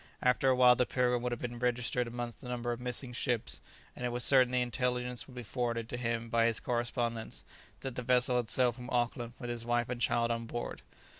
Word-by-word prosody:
After 125 +1 +3
a 130 - +4
while 125 -1 +7
the 125 0 +1
"Pilgrim" 125 -1 +1
would 125 0 -2
have 120 - -4
been 120 -1 -4
registered 125 0 0
amongst 120 0 -5
the 130 - -9
number 120 -1 -2
of 120 - -3
missing 125 0 +2
ships; 120 -2 -1 0.3
and - - -7
it 125 - +1
was 120 0 +1
certain 130 -2 +6
the 125 - +2
intelligence 125 0 -1
would 130 - -13
be 125 - -6
forwarded 115 -1 -2
to - - -3
him 115 -1 -2
by 115 0 +3
his 115 - +1
correspondents, 120 -1 -2 0.4
that 135 -2 -4
the 125 - -4
vessel 125 0 +3
had 120 -3 -1
sailed 125 -2 +3
from 125 +1 -9
Auckland 120 -1 -1
with 120 -2 -5
his 120 -1 -4
wife 120 0 0
and 125 -1 -4
child 115 -1 +2
on 115 0 -2
board. 120 +1 -5
120 Hz, 230 wpm, -32 LUFS, 120-125 Hz, 0.4 s, while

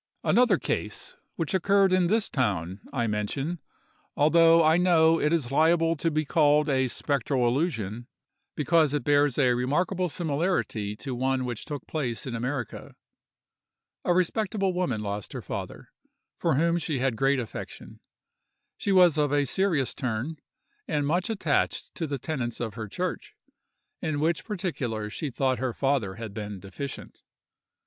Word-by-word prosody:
Another 245 +1 +4
case, - - -4 0.2
which 165 0 -2
occurred 195 +1 +3
in 185 -1 +3
this 220 +3 +2
town, 95 - -1
I 120 -3 -1
mention—although 155 +7 +1
I 160 +1 +5
know 165 -2 +4
it 150 - +2
is 150 -7 0
liable 165 +3 +3
to 165 - 0
be 155 0 -1
called 150 0 +3
a 130 -1 +2
spectral 130 -1 0
illusion—because 140 - -1
it 145 - -1
bears 145 -2 +3
a 130 -4 +4
remarkable 175 +9 0
similarity 145 - -1
to 130 +5 -6
one 130 +1 0
which 120 -3 -5
took 145 -2 -6
place 130 -7 -3
in 130 - -4
America. 120 +1 -4 1.1
A - - +1
respectable 195 +1 0
woman 135 -12 -1
lost 100 -1 -4
her - - -5
father, - - -6 0.5
for 165 -4 +1
whom 170 +4 +2
she 155 -3 -2
had 130 0 +1
a - - -9
great 135 +2 +2
affection; 120 - -8 0.8
she 200 - -1
was 180 -5 +5
of 145 -2 +2
a 145 -1 +2
serious 165 -5 +1
turn, 125 +6 -3 0.5
and 145 -1 0
much 175 +7 0
attached 190 -9 0
to 165 - -3
the 140 -1 -2
tenets 125 -4 -3
of 115 -3 -3
her 110 -1 -6
church, - - -4 0.7
in 155 -2 -1
which 155 -2 0
particulars 125 - -3
she 150 - -3
thought 130 0 0
her 130 -2 -1
father 135 -9 0
had 110 -2 -7
been 105 -2 -6
deficient. 100 +9 -8
145 Hz, 150 wpm, -27 LUFS, 120-165 Hz, 1.1 s, I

